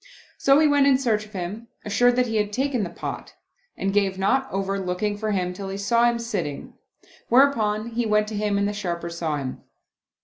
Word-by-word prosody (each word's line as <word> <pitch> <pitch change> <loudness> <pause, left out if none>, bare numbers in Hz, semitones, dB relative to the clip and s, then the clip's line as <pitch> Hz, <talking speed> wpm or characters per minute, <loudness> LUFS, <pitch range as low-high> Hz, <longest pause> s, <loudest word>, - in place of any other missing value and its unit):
So 275 0 +5
he 310 0 +5
went 285 -1 +4
in 270 -2 +5
search 220 -5 0
of 210 - -22
him, 200 +5 -5 0.2
assured 245 +4 +3
that 250 0 +3
he 225 -2 -1
had 210 -1 0
taken 260 +1 0
the 185 - -2
pot, - - -7 0.4
and 195 0 -1
gave 195 -2 +1
not 260 +8 +1
over 195 0 -1
looking 190 +3 -2
for 215 +1 -3
him 180 -3 -1
till 195 +1 -6
he 195 - -4
saw 235 +4 +2
him 235 - -1
sitting; 195 -11 -4 0.6
whereupon 230 -4 +3
he 235 0 -1
went 210 0 +2
to 220 - -5
him 205 -1 0
and 200 0 +1
the 205 - -2
Sharper 170 -4 -4
saw 165 -3 -2
him. 135 -2 -5
210 Hz, 210 wpm, -24 LUFS, 195-235 Hz, 0.6 s, So